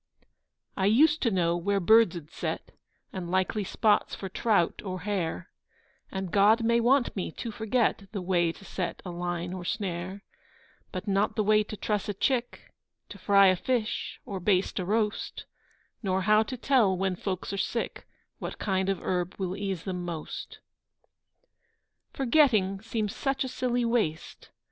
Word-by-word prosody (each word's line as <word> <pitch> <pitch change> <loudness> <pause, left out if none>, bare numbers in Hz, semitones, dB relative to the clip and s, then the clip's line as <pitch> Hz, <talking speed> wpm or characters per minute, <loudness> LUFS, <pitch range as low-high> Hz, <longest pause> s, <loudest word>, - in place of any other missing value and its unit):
I 190 -1 +1
used 300 +9 +4
to 235 - +3
know 175 -4 +1
where 200 +3 0
birds 220 -1 +5
ud 155 -2 -10
set, - - -4 0.4
And 180 -3 -5
likely 190 +3 0
spots 210 +2 +1
for 190 - -6
trout 200 -3 +1
or 185 -3 -4
hare, 180 - -3 0.6
And 190 -2 -4
God 210 +3 +5
may 235 +1 +3
want 250 +2 +3
me 185 -4 -3
to 230 - -5
forget 220 -2 0
The 205 - -3
way 175 -2 +2
to 195 - -15
set 180 -3 -4
a 180 - -4
line 175 0 -3
or 185 -1 -5
snare; 190 -1 -3 0.7
But 185 +3 -5
not 200 +1 +1
the 215 - +1
way 215 +1 +4
to 210 - -7
truss 210 -1 -1
a 205 - -2
chick, 245 +3 -1 0.4
To 200 - -10
fry 200 +1 +5
a 185 - +4
fish, 230 +3 -2
or 195 -2 -4
baste 185 +1 +1
a 180 - -2
roast, 210 +2 -1 0.6
Nor 190 -3 0
how 215 +2 +5
to 250 +4 -4
tell, 230 -7 +3
when 190 0 0
folks 185 +1 -4
are - - -2
sick, 230 +4 -3 0.3
What - - -5
kind 190 -1 0
of 195 -3 -2
herb 180 0 -1
will 185 -1 -2
ease 195 -4 -3
them 180 -2 -4
most! 170 -3 -6 1.5
Forgetting 235 -8 +3
seems 220 -2 -3
such 270 -1 -1
silly 245 -1 -1
waste! 220 -10 -1
200 Hz, 165 wpm, -28 LUFS, 185-220 Hz, 1.5 s, birds